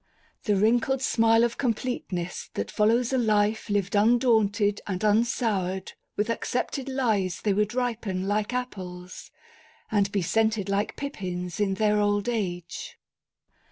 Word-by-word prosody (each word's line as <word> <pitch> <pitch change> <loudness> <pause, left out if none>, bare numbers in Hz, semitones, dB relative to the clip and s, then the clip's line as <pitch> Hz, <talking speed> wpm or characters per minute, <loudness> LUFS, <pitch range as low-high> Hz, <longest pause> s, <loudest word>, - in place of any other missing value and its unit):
The 210 - +2
wrinkled 240 +6 +2
smile 225 -1 +4
of 235 -1 -1
completeness 215 -8 -3
that 100 - -3
follows 230 +4 +2
a 260 - +3
life 215 -1 +1
lived 200 -1 0
undaunted 210 -2 +3
and 185 -3 -2
unsoured 210 -4 +1 0.3
with 210 - +1
accepted 250 +3 -2
lies 220 -9 0
they 205 - +2
would 210 +3 0
ripen 220 -7 -2
like 210 +2 0
apples, 185 -8 -6 0.6
and 200 -2 +2
be 200 -3 0
scented 220 +1 +1
like 200 +1 0
pippins 180 -10 -5
in 195 -2 +1
their 210 +1 +2
old 205 +1 +1
age. 175 -7 -4
210 Hz, 130 wpm, -26 LUFS, 195-230 Hz, 0.6 s, smile